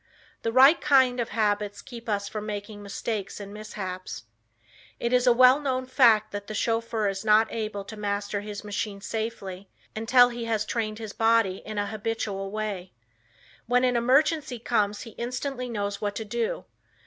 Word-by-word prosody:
The 230 - -1
right 270 +7 +7
kind 260 -4 +4
of 235 - -1
habits 205 -2 0
keeps 235 -3 -9
us 200 -1 -1
from 215 +1 -5
making 205 0 -6
mistakes 205 0 -4
and 200 0 -8
mishaps. 185 - -6 0.8
It 235 +1 -1
is 250 0 +3
a - - +8
well 255 +3 +6
known 260 -3 -1
fact 230 -5 +4
that 205 0 -6
a 215 - -4
chauffeur 225 -1 0
is 195 0 -3
not 215 +1 +4
able 215 -3 -3
to 220 - -8
master 205 -1 -2
his 205 0 -7
machine 205 0 -3
safely 200 -3 -5 0.3
until 245 +3 +5
he 240 -1 -5
has 220 -2 0
trained 215 -2 -2
his 220 -2 -7
body 225 -4 +3
in 215 -1 -5
a 205 - +1
habitual 210 -2 -3
way. 200 -3 -4 0.7
When 250 +1 +3
an 250 -1 +2
emergency 270 +3 +2
comes 210 -3 0
he 230 - -9
instantly 250 +1 -3
knows 205 -3 -3
what 205 -1 -2
to 220 - -4
do. 230 +1 -2
220 Hz, 170 wpm, -26 LUFS, 205-240 Hz, 0.8 s, a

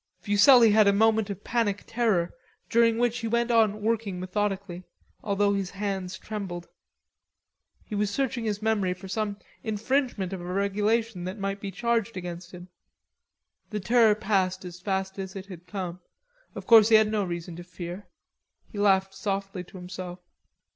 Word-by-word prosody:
Fuselli 215 +5 +6
had 215 0 +5
a 200 - +5
moment 220 0 +3
of 200 0 -6
panic 220 -4 0
terror, 215 -7 0 0.4
during 230 -1 +4
which 240 0 +1
he 230 - -3
went 235 +1 +1
on 215 -2 +3
working 215 -4 -1
methodically, 190 -1 -2 0.4
although 200 0 +2
his 195 -2 -2
hands 195 -2 -4
trembled. 185 -5 -6 1.2
He - - -9
was 205 0 +1
searching 250 +1 -1
his 210 -1 -2
memory 205 -5 +1
for 190 +1 -11
some 205 +1 -2 0.3
infringement 220 -3 -1
of 185 - -5
a - - -8
regulation 200 +2 0
that 185 +4 -5
might 195 0 -3
be 200 - -4
charged 230 +1 -1
against 175 -1 -6
him. 180 0 -11 1.0
The 210 - -3
terror 225 +1 +4
passed 190 -3 0
as 180 0 -8
fast 190 0 -2
as 190 0 -6
it 195 -1 -6
had 180 -3 -11
come. 180 -3 -5 0.6
Of - - -7
course 225 -2 +7
he 225 - +7
had 215 0 +5
no 210 -2 +1
reason 170 -1 -5
to 175 - -8
fear. 180 +2 -8 0.6
He 205 - -6
laughed 195 -1 +3
softly 195 -2 -3
to 185 - -12
himself. 180 0 -7
200 Hz, 165 wpm, -27 LUFS, 185-220 Hz, 1.2 s, course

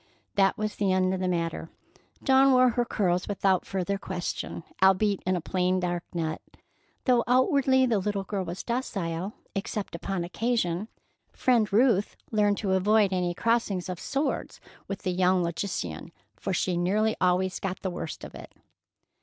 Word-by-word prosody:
That 195 -1 +3
was 215 0 -2
the 200 -2 +1
end 185 0 +2
of 190 - -2
the 185 - -1
matter. 165 -2 -2 0.5
Dawn 270 0 +5
wore 255 0 +6
her 240 +1 0
curls 180 -5 0
without 195 -2 +1
further 195 +1 -2
question, 175 -2 -4 0.2
albeit 195 +1 +4
in 185 - +2
a 175 - -2
plain, 185 +2 0
dark 175 -1 -2
net. 160 -3 -3 0.6
Though 245 -3 +4
outwardly 260 0 +4
the 230 -5 +2
little 200 0 -2
girl 195 -1 -3
was 175 +1 -6
docile, 195 -7 -3 0.2
except 200 +1 -4
upon 180 +1 -3
occasion, 200 -1 -1 0.5
Friend 235 -5 +2
Ruth 215 -2 +3 0.2
learned 205 -2 +2
to 200 -3 -1
avoid 200 +1 +3
any 180 -1 0
crossing 225 -4 +1
of 180 -2 -5
swords 275 +1 -2 0.3
with 195 - -5
the 185 - 0
young 180 0 +2
logician, 170 - -4 0.2
for 100 - -4
she 185 -1 0
nearly 210 +5 +1
always 185 +1 +2
got 190 -1 -4
the 190 - -1
worst 165 -3 -6
of - - -8
it. - - -10
190 Hz, 160 wpm, -27 LUFS, 180-215 Hz, 0.6 s, wore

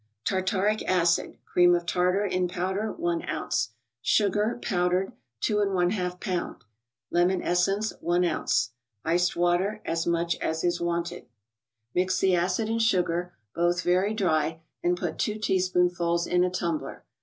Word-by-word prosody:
Tartaric 195 +2 +1
acid 175 -2 +2
(cream 175 0 +4
of 175 0 -2
tartar) 180 +3 +1
in 185 -2 0
powder, 190 +4 -2
i 170 -1 -1
oz.; 110 0 -1 0.3
Sugar, 210 - +2
powdered, 180 0 0 0.3
2%. 210 -1 +2
lb.; 180 -1 -1 0.5
Lemon 175 +1 +2
essence. 195 +5 +1
1 175 +1 +2
oz. 155 -7 0 0.3
Iced 175 +2 +2
water, 175 +5 +1
as 165 0 -1
much 170 0 +1
as 160 0 -2
is 175 -1 0
wanted. 170 -3 -2 0.7
Mix 185 +1 +1
the 190 -1 +3
acid 180 +5 0
and 225 +1 0
sugar, 180 -4 +1 0.2
both 175 0 +1
very 185 +4 +2
dry, 160 -5 0 0.2
and 175 0 +1
put - - -4
two 215 0 0
teaspoonfuls 180 -4 +1
in 180 0 +2
a 180 - +2
tumbler. 170 -3 -3
180 Hz, 135 wpm, -27 LUFS, 175-190 Hz, 0.7 s, cream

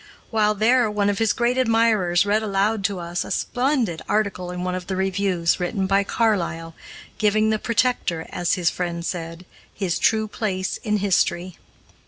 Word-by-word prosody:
While 215 -2 +2
there, 235 +2 +3
one 205 -1 +1
of 200 - -4
his 225 -2 +3
great 240 +2 +1
admirers 225 -7 +3
read 210 +2 +2
aloud 205 0 0
to 200 -2 0
us 175 0 -3
a - - -9
splendid 245 - 0
article 200 -4 -1
in 180 0 -5
one 180 0 -2
of 185 0 -5
the 190 - -2
reviews, 190 -3 0
written 190 +2 -1
by 195 +1 +2
Carlyle, 175 -7 -1 0.5
giving 215 +1 +2
"The 215 - 0
Protector," 230 -9 0
as 175 -1 0
his 175 -2 +1
friend 170 -1 -4
said, 165 0 -5 0.3
his 190 -4 -1
true 220 -1 +2
place 190 -4 -3
in 210 -1 -1
history. 185 -2 0
200 Hz, 170 wpm, -23 LUFS, 180-220 Hz, 0.5 s, there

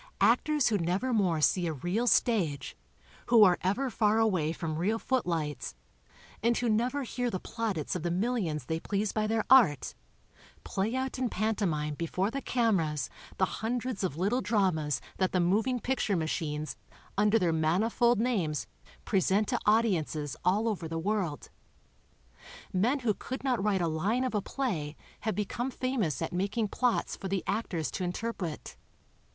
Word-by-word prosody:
Actors 300 -4 +3
who 210 -2 +1
never 185 +10 0
more 180 -8 +2
see 175 +3 +3
a 160 - -1
real 180 - -1
stage, 195 - +1 0.5
who 235 -3 +7
are 180 -3 +5
ever 245 +8 0
far 215 -1 +2
away 185 -9 +2
from 160 -2 -4
real 210 +6 +1
footlights, 165 - -2 0.7
and 235 +2 +2
who 245 - 0
never 245 +6 +1
hear 245 0 -2
the 185 - -3
plaudits 205 - -3
of 180 - -2
the 175 - -1
millions 180 - -1
they 160 +3 -2
please 200 +3 -1
by 215 -1 0
their 220 0 0
art, 225 - +5 0.7
play 210 +5 -1
out 260 0 -2
in 255 -2 0
pantomine 185 -9 -1
before 180 +6 -1
the 275 +2 -3
cameras 170 - 0 0.3
the 190 - +3 0.2
hundreds 240 -1 -2
of 160 -6 -2
little 205 +9 +1
dramas 185 - +1 0.2
that 185 -1 0
the 185 - +3
moving 215 +8 +2
picture 240 -4 0
machines 155 -2 -2 0.4
under 210 +2 +4
their 175 -6 +1
manifold 210 +9 +2
names 195 - 0 0.4
present 195 +1 +2
to - - +1
audiences 165 - +1
all 205 +5 +2
over 195 -7 -2
the 165 +1 -4
world; 180 -4 -2 1.2
men 240 +10 +2
who 225 -4 +2
could 260 +6 -6
not 250 -7 +1
write 200 -3 +2
a 170 - +1
line 195 +11 0
of 255 - -2
a 210 - +1
play 175 - -3 0.2
have 220 - -2
become 220 +5 -2
famous 255 - -1
at - - -4
making 200 +5 0
plots 245 +3 0
for 195 - -6
the 190 -1 -1
actors 195 -6 -2
to 185 - -3
interpret. 180 -3 -4
200 Hz, 160 wpm, -30 LUFS, 170-230 Hz, 1.2 s, who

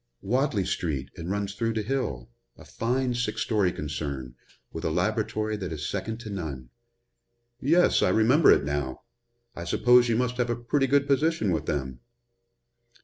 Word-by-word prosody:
"Wadley 120 -2 +1
street 70 -8 -2
and 85 +1 -6
runs 100 0 -2
through 115 +3 -1
to 110 -1 -2
Hill 105 - -3 0.3
a - - -14
fine 125 +2 -1
six 120 -3 -1
story 105 -5 +1
concern, 70 -5 -5 0.4
with - - -6
a - - 0
laboratory 110 0 -1
that 95 -4 -5
is 75 -1 -4
second 110 +3 -4
to 110 - -7
none." 70 -10 -6 0.9
"Yes, 165 +7 +3
I - - +3
remember 125 +9 +4
it - - +4
now. 70 -2 -3 0.5
I 85 - -6
suppose 120 +7 +4
you 115 - +2
must 125 0 -1
have 120 -1 0
a 120 - +1
pretty 135 +4 0
good 140 +1 +3
position 140 - +1
with 80 - -2
them." 65 -4 -3
105 Hz, 165 wpm, -27 LUFS, 80-125 Hz, 0.9 s, remember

